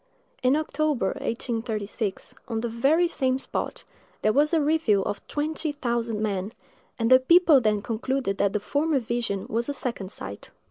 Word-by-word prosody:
In 255 +2 +4
October, 310 -8 0
1836, 225 -3 -3
on 225 -2 -2
the 240 - -1
very 280 +10 +3
same 260 -6 0
spot, 270 - -4 0.4
there 215 - +3
was 295 +2 +3
a 330 - +3
review 290 -10 +2
of 205 - -3
twenty 310 +1 -2
thousand 235 -5 -2
men; 200 0 -2 0.4
and 230 0 0
the 255 - +9
people 320 0 +6
then 210 -2 +1
concluded 235 -2 -2
that 200 -1 +2
the 210 - +1
former 290 +8 0
vision 235 -5 -2
was 235 +4 -1
a 285 - -2
second 235 -8 -4
sight. 100 - -8
240 Hz, 165 wpm, -26 LUFS, 215-290 Hz, 0.4 s, the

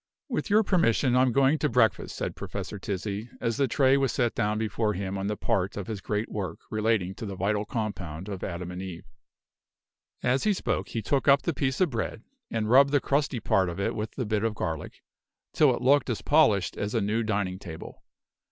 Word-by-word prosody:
"With 235 - -2
your 215 +2 +5
permission, 135 - +2
I 125 - +5
am 130 -1 +3
going 140 +4 +3
to 150 - +1
breakfast," 115 -3 +2
said - - -3
Professor 105 - -6
Tizzi, 100 +3 -4
as 115 +1 -1
the 140 -1 +2
tray 135 +2 +4
was 135 -3 +1
set 120 -3 0
down 105 +1 0
before 110 -1 -1
him 95 +1 -3
on 95 0 -2
the 105 0 -2
part 95 +1 -1
of 100 - -4
his 110 -4 -5
great 105 +4 -2
work 95 -6 -4
relating 110 -4 +1
to 110 - -7
the 100 - -5
vital 105 +3 0
compound 100 - -4
of 100 -3 -6
Adam 90 0 -4
and 90 +1 -6
Eve. 90 -3 -7 1.2
As 125 +2 +2
he 215 - +3
spoke, - - -2
he 115 - -3
took 135 +4 0
up 140 0 +6
the 170 - 0
piece 130 -2 -1
of 180 -5 +2
bread, 115 -1 -3 0.3
and 110 -1 -1
rubbed 135 +4 +6
the 145 0 +3
crusty 140 -2 0
part 95 -3 +2
of 85 +2 -6
it 100 - 0
with 110 0 -5
the 125 - -2
bit 105 0 0
of 115 -1 0
garlic, 80 -4 -5 0.5
till 150 -3 +5
it - - -6
looked 140 +2 +4
as 115 - -2
polished 100 -4 +3
as 105 +2 -3
a - - +3
new 105 +3 0
dining 100 -4 -1
table. 80 -5 -9
110 Hz, 215 wpm, -27 LUFS, 100-130 Hz, 1.2 s, up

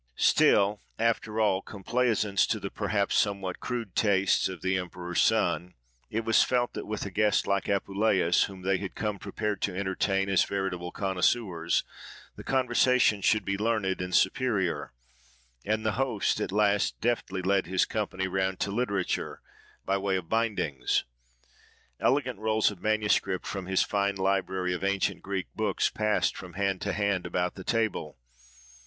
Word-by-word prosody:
Still, 100 0 +4 0.2
after 110 -1 0
all 100 -3 +2
complaisance 105 -1 0
to - - -1
the - - -5
perhaps 100 -2 0
somewhat 100 -3 0
crude 115 -6 -4
tastes 100 -4 +2
of 95 - -8
the 95 0 +1
emperor's 90 -1 -2
son, 90 -5 +1 0.3
it 110 +1 -2
was 115 - +5
felt 120 -1 +1
that - - -6
with 105 -1 -3
a 100 - -5
guest 105 +1 +2
like 100 0 0
Apuleius 100 -2 +2
whom 95 -2 -10
they 95 0 +1
had 100 -2 -6
come 105 -2 -2
prepared 105 +1 -3
to 95 -2 -2
entertain 95 0 0
as 95 -2 +3
veritable 95 -3 -3
connoisseurs, 95 -2 0 0.5
the - - -10
conversation 125 -4 +3
should 105 +1 +2
be 100 0 -2
learned 105 -4 0
and 90 0 -2
superior, 95 -3 +1 0.8
and 110 +1 0
the 110 - +2
host 120 -7 0
at - - -2
last 105 0 +2
deftly 105 -5 -1
led 95 0 +1
his 95 -1 +2
company 95 -3 -2
round 95 0 -1
to 100 - 0
literature, 100 -4 -2 0.5
by 95 - 0
the 100 - +1
way 95 -1 0
of 90 -3 -3
bindings. 100 - 0 1.0
Elegant 130 -6 +1
rolls 110 0 +2
of 100 - -12
manuscript 105 -3 +1
from 95 -2 -5
his 95 -1 +2
fine 100 -1 0
library 95 -1 0
of 90 - -4
ancient 100 0 0
Greek 95 -1 -3
books - - 0
passed 105 -1 +1
from 90 -2 -9
hand 100 +1 -1
to 100 - -1
hand 100 -2 0
about 90 0 -1
the 95 - -9
table. 110 - -1
100 Hz, 160 wpm, -28 LUFS, 95-110 Hz, 1.0 s, was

